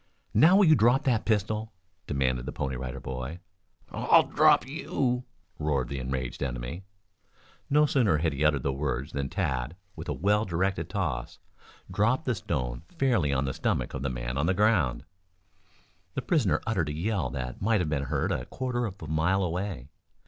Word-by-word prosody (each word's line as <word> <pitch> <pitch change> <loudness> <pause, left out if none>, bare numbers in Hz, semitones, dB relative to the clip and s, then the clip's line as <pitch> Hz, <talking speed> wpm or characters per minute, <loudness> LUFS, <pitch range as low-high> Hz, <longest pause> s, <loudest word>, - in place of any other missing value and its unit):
"Now 160 - +6
will 200 0 +6
you 160 - +7
drop 125 +2 +4
that 120 -5 +1
pistol?" 110 +1 0 0.3
demanded 65 -3 0
the - - -2
Pony 65 -1 -3
Rider 65 +1 -5
Boy. 65 +5 -5 0.5
"I'll - - +5
drop - - +4
you!" 125 -2 -1 0.3
roared 70 -5 0
the 70 - -3
enraged 65 -1 -4
enemy. 65 +7 -4 0.8
No 150 +2 +5
sooner 120 - +3
had 80 0 0
he 70 +2 -2
uttered 75 -4 +3
the 70 - 0
words 70 +1 -2
than 70 -1 -3
Tad, 65 +4 -2 0.2
with - - -7
a - - 0
well 105 +4 +2
directed 95 0 -1
toss, - - -3 0.5
dropped 120 +9 +1
the 125 - +1
stone - - -3 0.2
fairly 115 - +2
on 70 0 +1
the 65 - -2
stomach - - -1
of 70 - -4
the 70 - -1
man - - -3
on 75 - +1
the 95 - +2
ground. 100 - +2 1.1
The - - -2
prisoner - - +1
uttered 90 -9 0
a - - -3
yell 95 +1 -1
that 60 -1 -5
might 110 +2 +3
have 85 -4 -1
been 70 -2 -1
heard - - -1
a - - -2
quarter 125 -2 -2
of 100 -1 -9
a - - -6
mile 85 +6 +1
away. 90 -6 -3
80 Hz, 180 wpm, -28 LUFS, 65-110 Hz, 1.1 s, you